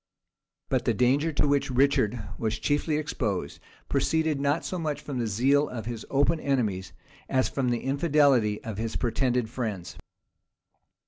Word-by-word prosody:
But -, -, 0 dB
the -, -, +2 dB
danger 140 Hz, +6 st, +2 dB
to 145 Hz, -, +2 dB
which 145 Hz, 0 st, +1 dB
Richard 125 Hz, -3 st, +2 dB, 0.2 s
was 110 Hz, 0 st, -1 dB
chiefly 150 Hz, +1 st, 0 dB
exposed, 120 Hz, -, -3 dB, 0.3 s
proceeded 160 Hz, -3 st, +1 dB
not 145 Hz, +3 st, +1 dB
so 185 Hz, -, -3 dB
much 155 Hz, -3 st, -2 dB
from 135 Hz, -4 st, -5 dB
the 115 Hz, -, 0 dB
zeal 135 Hz, +8 st, +2 dB
of 115 Hz, -4 st, -6 dB
his 115 Hz, -1 st, -6 dB
open 145 Hz, +4 st, +2 dB
enemies, 110 Hz, -11 st, -1 dB, 0.4 s
as 130 Hz, -1 st, +2 dB
from 130 Hz, -3 st, -1 dB
the 120 Hz, -1 st, 0 dB
infidelity 140 Hz, -6 st, +2 dB
of 110 Hz, -2 st, -5 dB
his 115 Hz, 0 st, -3 dB
pretended 125 Hz, -1 st, 0 dB
friends. 105 Hz, -8 st, -5 dB
130 Hz, 150 wpm, -27 LUFS, 115-145 Hz, 0.4 s, the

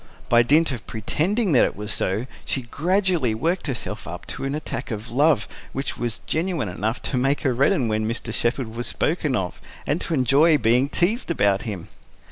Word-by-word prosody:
By 120 Hz, 0 st, +6 dB
dint 150 Hz, +6 st, +3 dB
of 120 Hz, -3 st, -6 dB
pretending 175 Hz, -, 0 dB
that 130 Hz, -, +6 dB
it -, -, 0 dB
was 105 Hz, +1 st, -3 dB
so, 105 Hz, +6 st, -1 dB, 0.2 s
she 130 Hz, -, -2 dB
gradually 170 Hz, -, +1 dB
worked 165 Hz, +9 st, -1 dB
herself 130 Hz, -4 st, -4 dB
up -, -, -6 dB
into -, -, -5 dB
an 135 Hz, +1 st, -1 dB
attack 140 Hz, -4 st, -4 dB
of 110 Hz, 0 st, -5 dB
love, 140 Hz, -3 st, +3 dB, 0.3 s
which 135 Hz, +1 st, -3 dB
was 115 Hz, -10 st, -3 dB
genuine 160 Hz, -, 0 dB
enough 110 Hz, +7 st, -3 dB
to 130 Hz, -, -1 dB
make 135 Hz, +3 st, +1 dB
her 130 Hz, -, +1 dB
redden 130 Hz, 0 st, +2 dB
when 110 Hz, 0 st, 0 dB
Mr. 115 Hz, -1 st, -3 dB
Shepherd 120 Hz, -1 st, -1 dB
was 120 Hz, +1 st, -3 dB
spoken 150 Hz, -4 st, 0 dB
of, 95 Hz, -5 st, -3 dB, 0.2 s
and 150 Hz, +4 st, 0 dB
to 165 Hz, -, -1 dB
enjoy 145 Hz, +4 st, +5 dB
being 125 Hz, +2 st, +3 dB
teased 190 Hz, -, 0 dB
about 100 Hz, -, +2 dB
him. 95 Hz, -3 st, -6 dB
130 Hz, 190 wpm, -23 LUFS, 110-155 Hz, 0.3 s, By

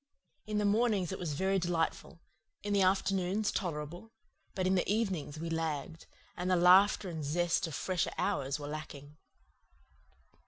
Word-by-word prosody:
In 215 Hz, -1 st, -1 dB
the 210 Hz, -, +1 dB
mornings 205 Hz, -4 st, +2 dB
it 190 Hz, -, -5 dB
was 165 Hz, -5 st, -3 dB
very 190 Hz, +4 st, +1 dB
delightful; 170 Hz, -1 st, -2 dB, 0.4 s
in 205 Hz, 0 st, -1 dB
the 200 Hz, -, +3 dB
afternoons 190 Hz, +2 st, +1 dB
tolerable; 175 Hz, +3 st, -4 dB, 0.5 s
but 185 Hz, -2 st, -1 dB
in 185 Hz, -, +3 dB
the 185 Hz, +1 st, +1 dB
evenings 190 Hz, -9 st, -1 dB
we 165 Hz, -, -4 dB
lagged, 160 Hz, 0 st, -3 dB, 0.3 s
and 180 Hz, +1 st, -3 dB
the 185 Hz, -, +4 dB
laughter 185 Hz, +3 st, +5 dB
and 160 Hz, -3 st, -5 dB
zest 170 Hz, +4 st, 0 dB
of 160 Hz, -, -6 dB
fresher 185 Hz, +1 st, -1 dB
hours 140 Hz, +1 st, -1 dB
were 145 Hz, -, -6 dB
lacking. 150 Hz, -1 st, -8 dB
180 Hz, 155 wpm, -32 LUFS, 155-195 Hz, 0.5 s, laughter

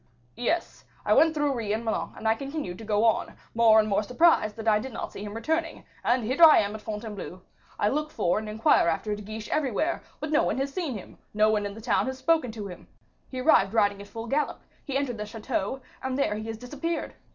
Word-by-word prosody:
"Yes, 330 Hz, +8 st, -2 dB, 0.2 s
I -, -, +4 dB
went 320 Hz, 0 st, +5 dB
through 295 Hz, -2 st, +1 dB
Ris 215 Hz, -4 st, -1 dB
and 230 Hz, +2 st, -5 dB
Melun, 220 Hz, -, -2 dB
and 220 Hz, -, -3 dB
I 220 Hz, -, +5 dB
continued 275 Hz, -, -5 dB
to -, -, -8 dB
go 210 Hz, +1 st, +1 dB
on, 225 Hz, -, +1 dB, 0.2 s
more 225 Hz, -1 st, +6 dB
and 215 Hz, -, +2 dB
more 200 Hz, -1 st, +2 dB
surprised 250 Hz, -3 st, +3 dB
that 225 Hz, 0 st, -7 dB
I 210 Hz, -1 st, +5 dB
did 260 Hz, +3 st, -7 dB
not -, -, -5 dB
see 200 Hz, -, -8 dB
him 205 Hz, 0 st, -6 dB
returning; 320 Hz, +7 st, -2 dB, 0.2 s
and 245 Hz, 0 st, +2 dB
here 260 Hz, +9 st, -1 dB
I 320 Hz, -2 st, +10 dB
am 205 Hz, 0 st, +1 dB
at 215 Hz, -, -7 dB
Fontainebleau; 210 Hz, -4 st, -6 dB, 0.3 s
I -, -, +2 dB
look 300 Hz, +6 st, 0 dB
for 175 Hz, -, 0 dB
and 215 Hz, 0 st, -6 dB
inquire 215 Hz, -4 st, +3 dB
after 170 Hz, +6 st, 0 dB
De 210 Hz, -, -9 dB
Guiche 215 Hz, +1 st, -7 dB
everywhere, 305 Hz, +3 st, 0 dB, 0.2 s
but 305 Hz, -, -4 dB
no 305 Hz, -, +4 dB
one -, -, 0 dB
has 275 Hz, +1 st, -2 dB
seen 305 Hz, -, -2 dB
him, 190 Hz, -, -12 dB, 0.2 s
no 215 Hz, +1 st, +4 dB
one 210 Hz, -1 st, 0 dB
in 200 Hz, -, -8 dB
the 225 Hz, -, -9 dB
town 220 Hz, -, +1 dB
has 260 Hz, 0 st, -3 dB
spoken 265 Hz, -2 st, +2 dB
to 215 Hz, -2 st, -6 dB
him; 180 Hz, -3 st, -10 dB, 0.4 s
he 255 Hz, -1 st, -4 dB
arrived 225 Hz, -8 st, +4 dB
riding 205 Hz, -2 st, +2 dB
at 200 Hz, -, -10 dB
full 225 Hz, +2 st, -7 dB
gallop, 285 Hz, +5 st, -1 dB, 0.2 s
he 275 Hz, -3 st, -2 dB
entered 255 Hz, -5 st, -2 dB
the 210 Hz, -, -3 dB
chateau; 220 Hz, +2 st, -3 dB, 0.2 s
and 260 Hz, 0 st, -2 dB
there 275 Hz, -, +1 dB
he 215 Hz, +1 st, -5 dB
has 225 Hz, -1 st, -4 dB
disappeared. 290 Hz, +8 st, -4 dB
225 Hz, 240 wpm, -27 LUFS, 210-275 Hz, 0.4 s, I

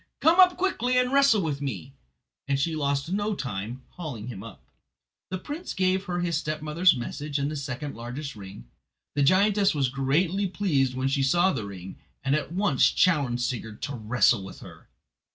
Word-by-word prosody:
Come 330 Hz, +4 st, +4 dB
up 365 Hz, -1 st, +7 dB
quickly 255 Hz, -10 st, 0 dB
and 250 Hz, +1 st, +2 dB
wrestle 275 Hz, -8 st, +5 dB
with 145 Hz, -3 st, -2 dB
me." 115 Hz, -, -5 dB, 0.5 s
And 140 Hz, -1 st, +1 dB
she 160 Hz, +3 st, 0 dB
lost 140 Hz, +1 st, -1 dB
no 205 Hz, +2 st, 0 dB
time 105 Hz, -, -4 dB
in 125 Hz, +2 st, -8 dB
hauling 135 Hz, -11 st, -7 dB
him 100 Hz, -6 st, -7 dB
up. 115 Hz, -2 st, -11 dB, 0.7 s
The 185 Hz, -, -3 dB
prince 295 Hz, -, -6 dB
gave 185 Hz, +1 st, +1 dB
her 175 Hz, -2 st, -2 dB
his 170 Hz, -3 st, 0 dB
stepmother's 155 Hz, +3 st, +2 dB
message 145 Hz, +4 st, -4 dB
and 140 Hz, +1 st, -1 dB
the -, -, -4 dB
second 140 Hz, 0 st, -5 dB
largest 125 Hz, +5 st, -6 dB
ring. 100 Hz, 0 st, -10 dB, 0.5 s
The 145 Hz, -, 0 dB
giantess 195 Hz, +5 st, +3 dB
was 135 Hz, -3 st, +1 dB
greatly 160 Hz, +9 st, +1 dB
pleased 145 Hz, -10 st, 0 dB
when 130 Hz, +1 st, -1 dB
she 135 Hz, +1 st, +1 dB
saw 175 Hz, +8 st, +3 dB
the 110 Hz, -7 st, -4 dB
ring, 95 Hz, -1 st, -9 dB, 0.3 s
and 135 Hz, -, +1 dB
at 155 Hz, +1 st, -1 dB
once 180 Hz, -7 st, +3 dB
challenged 140 Hz, -9 st, +2 dB
Sigurd 110 Hz, -4 st, -4 dB
to 140 Hz, -, -3 dB
wrestle 120 Hz, -2 st, +2 dB
with 95 Hz, -, -10 dB
her. -, -, -13 dB
145 Hz, 185 wpm, -26 LUFS, 125-185 Hz, 0.7 s, up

